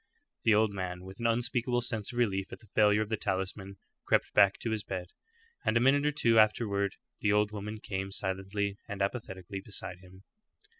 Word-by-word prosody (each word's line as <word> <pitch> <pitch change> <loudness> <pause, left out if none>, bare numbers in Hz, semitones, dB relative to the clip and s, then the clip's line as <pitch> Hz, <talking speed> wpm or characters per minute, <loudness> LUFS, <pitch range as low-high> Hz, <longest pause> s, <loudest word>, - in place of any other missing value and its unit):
The 110 - +6
old 110 -1 +3
man, 90 -2 -4
with 95 +1 -11
an 115 - +1
unspeakable 120 +1 +1
sense 115 -4 -1
of 120 - -8
relief 95 -5 0
at - - -7
the 110 - -20
failure 105 0 +4
of 105 - -9
the 110 - 0
talisman, 95 0 -3 0.3
crept - - +1
back 100 -1 +5
to 115 - -2
his 110 -2 -1
bed, 90 -3 -5 0.5
and 115 - +2
a - - +5
minute 140 +4 +4
or - - +3
two 115 -6 +4
afterward 105 -2 +2 0.2
the 105 - +2
old 105 0 +3
woman 105 +1 -5
came 95 -1 -4
silently 100 +1 -2
and 100 0 -2
apathetically 100 -3 -4
beside 95 -3 -3
him. 95 +1 -16
105 Hz, 195 wpm, -30 LUFS, 95-110 Hz, 0.5 s, The